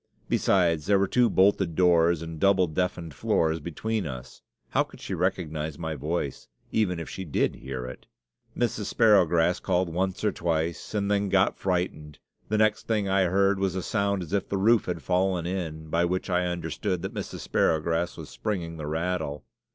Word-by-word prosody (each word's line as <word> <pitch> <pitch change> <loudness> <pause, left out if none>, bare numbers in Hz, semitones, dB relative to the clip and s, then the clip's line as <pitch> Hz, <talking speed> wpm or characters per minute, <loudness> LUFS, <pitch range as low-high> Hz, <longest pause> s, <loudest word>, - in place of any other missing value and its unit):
Besides, 85 -5 +2
there 100 - +5
were 100 - +3
two 125 +2 +3
bolted 95 -3 +3
doors 85 -2 +4
and 80 -1 -7
double 100 0 +4
deafened 85 -1 -2
floors 80 +4 +1
between 95 +5 -3
us; 65 -3 -8 0.3
how - - +2
could - - -6
she - - -5
recognize 80 -3 -2
my 80 -1 -3
voice, 75 -2 -3 0.2
even 90 -6 +1
if 85 - -6
she 95 - -6
did 80 - 0
hear 65 -1 -6
it? 65 - -9 0.5
Mrs. 115 -3 0
Sparrowgrass 90 -7 +4
called 90 -1 0
once 95 +2 -1
or 105 - +3
twice 85 +2 -2
and 100 -1 0
then 100 -1 +1
got 95 0 +3
frightened; 90 -5 -2 0.3
the 110 - +1
next 110 0 +2
thing 105 -3 +1
I 95 0 +3
heard 100 +2 +2
was 95 -2 0
a 95 - -2
sound 100 -3 0
as 85 - -9
if 100 - 0
the 100 - -1
roof 110 +3 +4
had 85 -2 -4
fallen 90 -1 +1
in, 80 -4 -4
by 85 +1 +2
which 90 +2 -2
I 90 0 +2
understood 90 0 -3
that - - -4
Mrs. - - -5
Sparrowgrass 80 +2 +1
was - - -8
springing 85 -6 -3
the 75 -2 -5
rattle! 80 -2 -2
90 Hz, 180 wpm, -27 LUFS, 80-100 Hz, 0.5 s, there